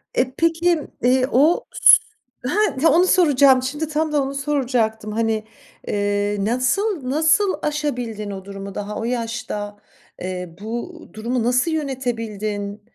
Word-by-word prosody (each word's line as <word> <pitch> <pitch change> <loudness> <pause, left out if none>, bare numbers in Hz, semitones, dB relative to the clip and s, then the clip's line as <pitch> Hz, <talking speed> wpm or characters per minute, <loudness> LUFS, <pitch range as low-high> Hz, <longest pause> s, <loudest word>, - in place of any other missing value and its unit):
E, 255 +1 +1
peki, 335 0 +2 0.2
eee, 255 +1 +4
o 300 +7 +3
s - - +8 0.5
ha, 360 -7 +2
onu 350 +5 +4
soracağım. 280 -8 +5
Şimdi 295 +4 -3
tam 310 +1 -1
da 295 -1 +2
onu 270 +1 -4
soracaktım. 250 -6 -1
Hani, 220 0 0 0.4
eee, 205 0 0
nasıl, 255 - 0
nasıl 320 +7 +3
aşabildin 245 -9 -3
o 190 -1 -8
durumu 195 0 -8
daha 205 +1 -5
o - - -4
yaşta? 230 -3 -4 0.4
Eee, 180 -2 -5
bu 240 - -5
durumu 235 +2 -2
nasıl 250 +7 +2
yönetebildin? 225 -8 -3
250 Hz, 130 wpm, -21 LUFS, 215-300 Hz, 0.5 s, s